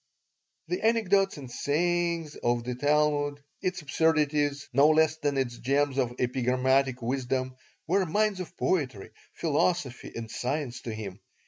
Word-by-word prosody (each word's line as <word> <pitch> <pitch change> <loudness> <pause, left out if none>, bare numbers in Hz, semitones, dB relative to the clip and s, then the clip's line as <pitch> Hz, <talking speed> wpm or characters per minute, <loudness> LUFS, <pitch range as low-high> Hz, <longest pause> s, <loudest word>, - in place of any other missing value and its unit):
The 360 - -2
anecdotes 200 -5 +3
and 130 -4 -9
sayings 170 +2 0
of 120 0 0
the 125 +1 -3
Talmud, 145 +1 +1 0.2
its 185 -2 -2
absurdities 150 -1 +1
no 140 +3 +6
less 155 0 +3
than 145 -3 -1
its 120 -3 -1
gems 140 +1 +1
of 120 -2 0
epigrammatic 130 +1 +1
wisdom, 130 +1 -1 0.3
were 185 +2 +1
mines 210 +3 +1
of 180 0 -7
poetry, 130 - -1 0.2
philosophy, 150 -4 0
and 115 -1 -6
science 125 -2 -3
to 115 - -5
him. 100 -3 -7
145 Hz, 135 wpm, -28 LUFS, 125-160 Hz, 0.3 s, no